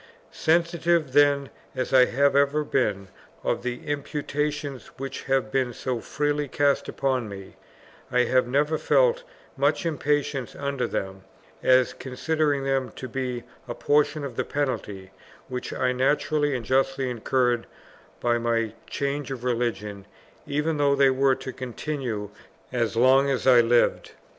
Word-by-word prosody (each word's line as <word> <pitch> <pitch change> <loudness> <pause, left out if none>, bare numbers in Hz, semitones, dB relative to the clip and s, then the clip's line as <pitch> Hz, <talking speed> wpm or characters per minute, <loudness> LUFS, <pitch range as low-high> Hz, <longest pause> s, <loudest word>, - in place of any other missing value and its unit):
Sensitive 170 -2 +1
then 140 -2 +4 0.2
as 130 - -3
I 130 -1 +7
have 140 +2 +2
ever 140 +2 +3
been 100 -9 0 0.4
of - - 0
the 125 0 -5
imputations 145 -1 -3
which 135 0 -6
have 135 -5 0
been 130 -2 0
so 125 0 -3
freely 145 +4 -1
cast 140 +1 +1
upon 130 -5 -1
me, 95 -1 -10 0.6
I 125 - +3
have 130 0 +2
never 150 +4 +1
felt - - +3 0.3
much 145 +6 +1
impatience 145 -4 -1
under 140 -2 -2
them, 95 0 -4 0.4
as 130 -1 +4
considering 145 +2 -1
them 135 -1 0
to 130 - -6
be 125 -1 -3 0.2
a 120 - -5
portion 145 0 +1
of 130 -4 -6
the - - +1
penalty 105 -9 -3 0.4
which 125 -1 -4
I 130 -1 0
naturally 145 +2 +1
and 120 -3 -4
justly 135 +1 +1
incurred 120 0 0 0.5
by 120 -1 +1
my 115 -2 0 0.2
change 140 +1 -2
of 130 -3 -6
religion, 115 -5 -2 0.4
even 150 +2 0
though 140 -1 +3
they 135 -1 +5
were 135 0 +3
to 130 - -7
continue 125 -5 -4 0.4
as 115 -2 0
long 130 +4 +5
as 135 -2 -1
I 125 -2 +7
lived. 120 +1 +2
135 Hz, 145 wpm, -25 LUFS, 125-145 Hz, 0.6 s, I